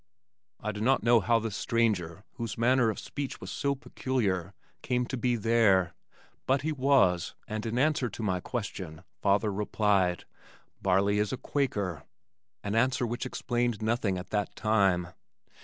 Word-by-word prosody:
I 105 Hz, -, -3 dB
do 105 Hz, 0 st, -6 dB
not 130 Hz, +4 st, +3 dB
know 120 Hz, 0 st, +5 dB
how 115 Hz, +2 st, +3 dB
this 110 Hz, -2 st, -3 dB
stranger 105 Hz, -7 st, 0 dB
whose 115 Hz, -4 st, -5 dB
manner 120 Hz, 0 st, +3 dB
of 110 Hz, -, -3 dB
speech 140 Hz, -2 st, -5 dB
was -, -, -7 dB
so 140 Hz, -1 st, 0 dB
peculiar, 100 Hz, -, -2 dB, 0.3 s
came 125 Hz, 0 st, 0 dB
to 130 Hz, -, -4 dB
be 125 Hz, 0 st, +1 dB
there, 105 Hz, -6 st, +3 dB, 0.5 s
but 135 Hz, +1 st, +2 dB
he 160 Hz, -, 0 dB
was 130 Hz, -, +2 dB
and 110 Hz, +1 st, -4 dB
in 115 Hz, +2 st, -2 dB
answer 140 Hz, -2 st, +2 dB
to 115 Hz, -, -7 dB
my 95 Hz, -3 st, 0 dB
question, 95 Hz, -7 st, -5 dB, 0.2 s
father 100 Hz, +1 st, +2 dB
replied, 100 Hz, -3 st, +1 dB, 0.6 s
"Barley 100 Hz, +2 st, +2 dB
is 105 Hz, -1 st, 0 dB
a 130 Hz, -, -2 dB
Quaker," 100 Hz, -, -2 dB, 0.6 s
an 100 Hz, -, -2 dB
answer 125 Hz, +2 st, +2 dB
which 120 Hz, +2 st, -3 dB
explained 120 Hz, -3 st, -1 dB
nothing 110 Hz, -4 st, 0 dB
at 90 Hz, -, -8 dB
that 105 Hz, -2 st, -1 dB
time. 95 Hz, -5 st, +2 dB
110 Hz, 155 wpm, -29 LUFS, 100-125 Hz, 0.6 s, know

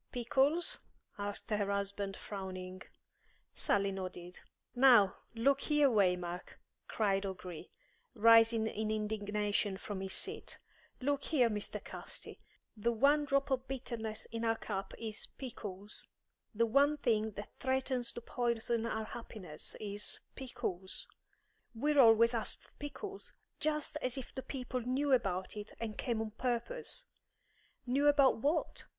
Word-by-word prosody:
"Pickles?" 270 Hz, +7 st, +2 dB, 0.4 s
asked 205 Hz, +2 st, -4 dB
her 205 Hz, -1 st, +1 dB
husband, 200 Hz, 0 st, -2 dB
frowning. 185 Hz, -2 st, -6 dB, 0.7 s
Sally 200 Hz, -1 st, +1 dB
nodded. 180 Hz, -2 st, -6 dB, 0.3 s
"Now, 240 Hz, -7 st, +6 dB, 0.2 s
look 275 Hz, +4 st, +3 dB
here, 295 Hz, -2 st, +4 dB
Waymark," 180 Hz, -4 st, +1 dB, 0.3 s
cried 195 Hz, -3 st, +1 dB
O'Gree, 180 Hz, -4 st, -6 dB, 0.5 s
rising 225 Hz, 0 st, +6 dB
in 220 Hz, 0 st, -2 dB
indignation 210 Hz, -2 st, 0 dB
from 195 Hz, -1 st, -5 dB
his 190 Hz, 0 st, -4 dB
seat. -, -, -3 dB, 0.4 s
"Look 285 Hz, +1 st, 0 dB
here, 250 Hz, -7 st, +3 dB
Mr. 210 Hz, -1 st, -4 dB
Casti. -, -, -7 dB, 0.4 s
The 230 Hz, +2 st, +1 dB
one 285 Hz, +6 st, +4 dB
drop 275 Hz, 0 st, +1 dB
of 260 Hz, 0 st, 0 dB
bitterness 235 Hz, -5 st, -4 dB
in 230 Hz, 0 st, -3 dB
our 225 Hz, 0 st, +3 dB
cup 195 Hz, -3 st, -4 dB
is 220 Hz, -2 st, -4 dB
pickles; 210 Hz, -6 st, -7 dB, 0.4 s
the 230 Hz, +1 st, +2 dB
one 280 Hz, +6 st, +4 dB
thing 220 Hz, -5 st, +1 dB
that 205 Hz, +1 st, -8 dB
threatens 260 Hz, -2 st, 0 dB
to 240 Hz, -, -6 dB
poison 235 Hz, -1 st, 0 dB
our 220 Hz, -1 st, -2 dB
happiness 205 Hz, -9 st, -7 dB
is 205 Hz, -1 st, -3 dB
pickles. 190 Hz, -8 st, -3 dB, 0.7 s
We're 290 Hz, +5 st, +2 dB
always 230 Hz, -1 st, +7 dB
being 230 Hz, -2 st, 0 dB
asked -, -, -3 dB
for -, -, -22 dB
pickles; 390 Hz, +7 st, -6 dB, 0.3 s
just 300 Hz, -1 st, +1 dB
as 255 Hz, +1 st, 0 dB
if 265 Hz, -, -6 dB
the 260 Hz, -, -4 dB
people 255 Hz, -1 st, -4 dB
knew 265 Hz, +4 st, +1 dB
about 190 Hz, -7 st, +1 dB
it, 210 Hz, 0 st, -7 dB
and 220 Hz, -2 st, -3 dB
came 230 Hz, 0 st, -1 dB
on 220 Hz, -1 st, -3 dB
purpose!" 260 Hz, -, -2 dB, 0.8 s
"Knew 270 Hz, +4 st, +2 dB
about 285 Hz, -2 st, +6 dB
what?" 295 Hz, +8 st, 0 dB
225 Hz, 135 wpm, -34 LUFS, 205-265 Hz, 0.8 s, always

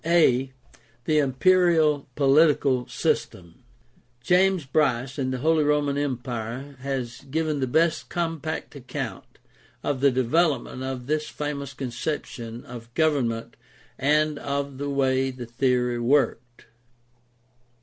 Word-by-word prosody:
a) 135 Hz, -6 st, +3 dB, 0.5 s
The 155 Hz, -1 st, +3 dB
imperial 155 Hz, +1 st, +3 dB
political 140 Hz, -3 st, +3 dB
system. 85 Hz, +1 st, -2 dB, 0.3 s
— 120 Hz, 0 st, -34 dB
^James 185 Hz, -4 st, +3 dB
Bryce 135 Hz, -2 st, 0 dB
in 130 Hz, -1 st, 0 dB
The 130 Hz, -, -2 dB
Holy 155 Hz, +4 st, +2 dB
Roman 145 Hz, -1 st, +1 dB
Empire 130 Hz, -1 st, -4 dB
has 130 Hz, -3 st, -4 dB
given 155 Hz, 0 st, -1 dB
the 130 Hz, -, 0 dB
best 160 Hz, +5 st, +1 dB
compact 165 Hz, -3 st, -3 dB
account 130 Hz, -3 st, -6 dB, 0.5 s
of 135 Hz, -3 st, -1 dB
the 140 Hz, -, +6 dB
development 130 Hz, +2 st, +1 dB
of 130 Hz, -1 st, -4 dB
this 150 Hz, +2 st, -1 dB
famous 140 Hz, -2 st, -5 dB
conception 120 Hz, -3 st, -5 dB
of 120 Hz, -1 st, -10 dB
government 130 Hz, -8 st, 0 dB, 0.4 s
and 150 Hz, +1 st, +2 dB
of 140 Hz, -1 st, -3 dB
the 145 Hz, 0 st, -2 dB
way 135 Hz, -1 st, +1 dB
the 125 Hz, -2 st, -7 dB
theory 125 Hz, 0 st, 0 dB
worked. 120 Hz, -2 st, 0 dB
140 Hz, 120 wpm, -25 LUFS, 125-150 Hz, 0.5 s, the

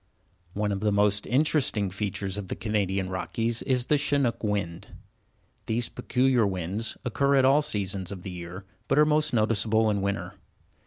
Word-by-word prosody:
One 105 Hz, 0 st, -1 dB
of 100 Hz, -, -1 dB
the 105 Hz, +1 st, +1 dB
most 100 Hz, 0 st, +2 dB
interesting 130 Hz, -7 st, +1 dB
features 95 Hz, -1 st, -3 dB
of 100 Hz, -, -6 dB
the -, -, -4 dB
Canadian 100 Hz, -2 st, -1 dB
Rockies 115 Hz, +5 st, -2 dB
is 125 Hz, -3 st, 0 dB
the 150 Hz, +1 st, +2 dB
Chinook 140 Hz, -5 st, 0 dB
wind. 100 Hz, -5 st, -2 dB, 0.8 s
These 115 Hz, +1 st, 0 dB
peculiar 125 Hz, -3 st, +2 dB
winds 95 Hz, +4 st, -3 dB
occur 140 Hz, +4 st, +2 dB
at 135 Hz, -1 st, +5 dB
all 140 Hz, +3 st, +5 dB
seasons 100 Hz, -, -2 dB
of 95 Hz, -3 st, -7 dB
the 95 Hz, -, -6 dB
year 90 Hz, +2 st, -8 dB, 0.2 s
but 135 Hz, -, +1 dB
are 150 Hz, -, +7 dB
most 155 Hz, 0 st, +2 dB
noticeable 110 Hz, -1 st, +2 dB
in 100 Hz, -1 st, -1 dB
winter. 100 Hz, +1 st, -2 dB
105 Hz, 165 wpm, -27 LUFS, 100-125 Hz, 0.8 s, are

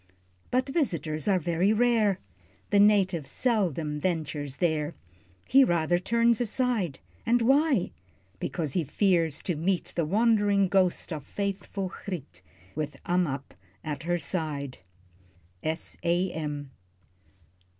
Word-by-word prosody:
But 255 Hz, +2 st, +1 dB
visitors 170 Hz, -, -1 dB
are 195 Hz, -2 st, +4 dB
very 175 Hz, +3 st, +1 dB
rare, 220 Hz, -4 st, +3 dB, 0.5 s
The 205 Hz, -, +5 dB
native 195 Hz, -7 st, +4 dB
seldom 170 Hz, -, 0 dB
ventures 150 Hz, -5 st, -2 dB
there, 155 Hz, -1 st, 0 dB, 0.5 s
He 270 Hz, +2 st, +7 dB
rather 175 Hz, -4 st, +2 dB
turns 230 Hz, +4 st, +2 dB
aside. 230 Hz, -, 0 dB, 0.3 s
And 240 Hz, 0 st, +2 dB
why? 270 Hz, -, +3 dB, 0.5 s
Because 155 Hz, -6 st, -3 dB
he 175 Hz, -, +1 dB
fears 165 Hz, -1 st, +1 dB
to 175 Hz, -, -1 dB
meet 175 Hz, +4 st, -1 dB
The 170 Hz, -, +1 dB
wandering 205 Hz, -1 st, +3 dB
ghost 185 Hz, -2 st, +1 dB
of 150 Hz, -3 st, -5 dB
faithful 200 Hz, +1 st, -3 dB
Griet 140 Hz, -, -7 dB, 0.3 s
With 150 Hz, 0 st, -4 dB
Ammap 165 Hz, -7 st, -1 dB, 0.3 s
at 150 Hz, -2 st, -4 dB
her 175 Hz, +2 st, 0 dB
side. 150 Hz, -4 st, -4 dB, 0.8 s
_S. 160 Hz, +1 st, -3 dB
A. 175 Hz, +2 st, +1 dB
M. 145 Hz, -3 st, -4 dB
180 Hz, 120 wpm, -28 LUFS, 155-205 Hz, 0.8 s, He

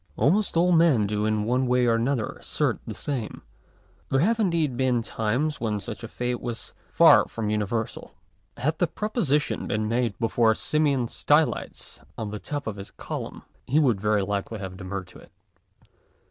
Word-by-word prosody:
Almost 170 Hz, -, +2 dB
all 180 Hz, +2 st, +4 dB
men 165 Hz, -10 st, +4 dB
do 105 Hz, +1 st, -1 dB
in 110 Hz, -1 st, +1 dB
one 125 Hz, +4 st, +1 dB
way 125 Hz, 0 st, +3 dB
or 115 Hz, -1 st, +2 dB
other 125 Hz, -6 st, 0 dB
assert -, -, -2 dB
the -, -, -5 dB
same. 130 Hz, -7 st, -4 dB, 0.7 s
There 135 Hz, -, +2 dB
have 225 Hz, +6 st, +2 dB
indeed 170 Hz, -, +1 dB
heen 125 Hz, -2 st, +1 dB
times 125 Hz, +8 st, -1 dB
when 105 Hz, -3 st, -1 dB
such 115 Hz, +2 st, -8 dB
a -, -, -4 dB
faith 125 Hz, +1 st, -3 dB
was 120 Hz, -1 st, -5 dB, 0.2 s
far -, -, +6 dB
from 110 Hz, -2 st, -3 dB
uni 105 Hz, -1 st, +1 dB
versal. 115 Hz, +1 st, -4 dB, 0.4 s
Had 150 Hz, +6 st, -1 dB
the 175 Hz, -, +3 dB
proposition 165 Hz, -, -1 dB
heen 105 Hz, 0 st, 0 dB
made 115 Hz, -2 st, 0 dB
hefore 115 Hz, -1 st, +3 dB
Simeon 145 Hz, -5 st, +1 dB
Stylites -, -, 0 dB, 0.2 s
on 110 Hz, -2 st, -4 dB
the 105 Hz, -, -5 dB
top 145 Hz, +4 st, -4 dB
of 110 Hz, -2 st, -4 dB
his 100 Hz, -, -8 dB
column, -, -, -7 dB, 0.2 s
he 140 Hz, -, +1 dB
would 120 Hz, -10 st, +2 dB
very 105 Hz, -1 st, +2 dB
likely 100 Hz, +3 st, -3 dB
have 95 Hz, -2 st, -6 dB
demurred 95 Hz, 0 st, -5 dB
to -, -, -14 dB
it. -, -, -17 dB
120 Hz, 175 wpm, -25 LUFS, 105-145 Hz, 0.7 s, far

